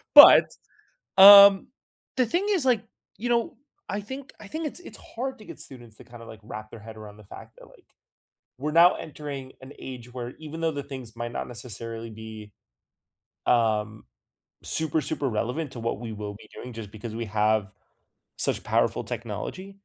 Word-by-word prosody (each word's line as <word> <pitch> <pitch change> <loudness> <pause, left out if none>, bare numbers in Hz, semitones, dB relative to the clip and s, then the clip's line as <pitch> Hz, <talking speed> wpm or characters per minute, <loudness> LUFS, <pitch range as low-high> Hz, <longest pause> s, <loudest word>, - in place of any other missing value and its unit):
But, - - +10 0.6
um, 200 0 +10 0.5
the 255 -2 +3
thing 355 - -1
is, 360 -9 +1
like, 240 -5 +2 0.4
you 240 +3 -3
know, 235 -1 0 0.3
I 205 - -2
think 265 +6 -9
I 210 - -10
think 315 +8 -4
it's 325 - -6
it's - - -10 0.2
hard 265 +1 -3
to 215 - -14
get - - -10
students 120 -5 -10
to - - -15
kinda, 120 -1 -13
like, 110 -1 -12
wrap 110 0 -9
their 115 - -11
head 110 0 -11
around 105 -1 -11
the 105 - -15
fact - - -13
that, - - -14
like, - - -22 0.7
we're 150 +3 -3
now 170 +2 +6
entering 140 -4 -8
an 130 +2 -11
age 125 -2 -9
where 120 -1 -6
even 160 +1 -8
though 165 -1 +1
the 140 -2 -5
things 130 -5 -9
might 120 0 -5
not - - -4
necessarily 115 -1 -7
be, 110 -1 -10 1.0
um, 110 -2 +1 0.6
super, 160 0 -1
super 140 -2 -3
relevant 125 +7 -3
to 120 - -8
what 115 -3 -2
we 115 -2 -6
will 105 -1 -6
be 105 - -15
doing 125 - -9
just 110 -3 -8
because 110 +1 -8
we 115 0 -4
have 105 -1 0 0.7
such - - +1
powerful - - +1
technology 120 - -6
125 Hz, 180 wpm, -26 LUFS, 110-170 Hz, 1.0 s, But